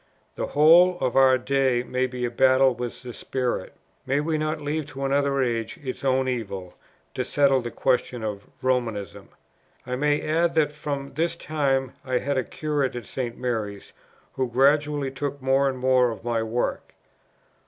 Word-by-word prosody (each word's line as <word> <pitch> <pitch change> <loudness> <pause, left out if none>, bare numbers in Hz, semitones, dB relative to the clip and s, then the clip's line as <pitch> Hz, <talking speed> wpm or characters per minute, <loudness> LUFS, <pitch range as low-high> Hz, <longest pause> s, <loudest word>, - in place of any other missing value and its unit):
The - - -3
whole 170 +5 +6
of 125 - -1
our 130 -1 +6
day 130 -1 +1
may 130 +1 -1
be 125 -1 -4
a 120 - -3
battle 130 +1 +4
with 120 +1 -6
this 125 -2 -8
spirit. 125 -2 -3 0.3
May 135 +2 +2
we 155 +2 -1
not 155 0 -1
leave 150 0 -3
to 135 -1 -5
another 140 0 +1
age 115 -2 -2
its 130 0 -5
own 130 -1 +2
evil, 100 -8 -4 0.4
to - - -2
settle 140 -2 +3
the 120 - -5
question 125 -1 0
of 105 -2 -5 0.2
Romanism?" 120 -6 -2 0.6
I 125 0 -3
may 145 +2 +1
add 165 +2 +1
that 150 -2 +3
from 145 -2 -5
this 170 +1 0
time 140 -5 -1
I 130 -1 0
had 140 +3 -1
a 130 - +1
curate 145 -4 -2
at 120 -3 -6
St. 120 -1 -4
Mary's, 110 -5 -4 0.4
who 130 -2 -1
gradually 145 +2 +2
took 140 +1 -4
more 135 +1 +2
and 130 - -4
more 130 -1 +3
of 115 - -7
my 120 -1 0
work. 115 +2 -3
130 Hz, 175 wpm, -25 LUFS, 125-145 Hz, 0.6 s, whole